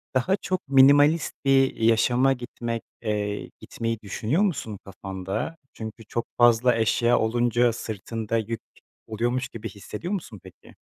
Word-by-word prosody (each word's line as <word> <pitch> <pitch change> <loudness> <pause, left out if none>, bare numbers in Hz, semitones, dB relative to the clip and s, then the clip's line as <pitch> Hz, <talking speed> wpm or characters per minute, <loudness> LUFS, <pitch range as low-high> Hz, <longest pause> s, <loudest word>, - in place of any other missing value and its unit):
daha 160 +10 +2
çok 185 -4 -3
minimalist 145 +4 +5
bir 135 -1 +4
yaşama 120 +4 +3
gitmek, 120 -2 -5 0.2
eee, 105 -2 -2
gitmeyi 115 -1 -4
düşünüyor 115 - -1
musun 155 - -1
kafanda? 95 - -5 0.2
Çünkü 110 0 -8
çok 115 +2 -3
fazla 120 0 +5
eşya 120 +1 +2
olunca 120 +1 +2
sırtında 110 +1 -4
yük 115 +1 -3 0.5
oluyormuş 120 +3 -1
gibi 115 0 -7
hissediyor 105 - -6
musun 140 - -5
peki? - - -16
115 Hz, 125 wpm, -25 LUFS, 110-130 Hz, 0.5 s, minimalist